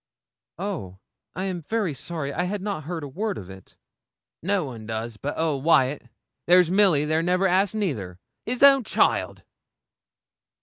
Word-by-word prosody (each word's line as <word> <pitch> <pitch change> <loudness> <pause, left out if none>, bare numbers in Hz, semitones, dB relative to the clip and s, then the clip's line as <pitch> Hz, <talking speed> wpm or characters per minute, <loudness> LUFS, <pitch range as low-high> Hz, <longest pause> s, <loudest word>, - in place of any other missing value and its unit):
'Oh! 170 - -5 0.4
I'm 185 0 -3
very 200 0 -1
sorry. 140 0 -5
I 180 - -1
had 195 +1 -3
not 200 -8 -4
heard 165 -1 -4
a - - -5
word 200 +8 -3
of 95 -1 -9
it.' 95 -1 -15 0.6
'No 195 +2 0
one 115 -6 -8
does 110 0 -4
but 145 +6 -4
old 155 -4 -1
Wyat. 135 -5 +2 0.4
There's 180 -1 +5
Milly 185 -7 +4
there 155 +1 +1
never 180 +3 +1
asks 190 +2 +2
neither 115 - -3 0.3
his 250 +3 -1
own 275 -2 +7
child!' - - 0
170 Hz, 150 wpm, -25 LUFS, 135-195 Hz, 0.6 s, own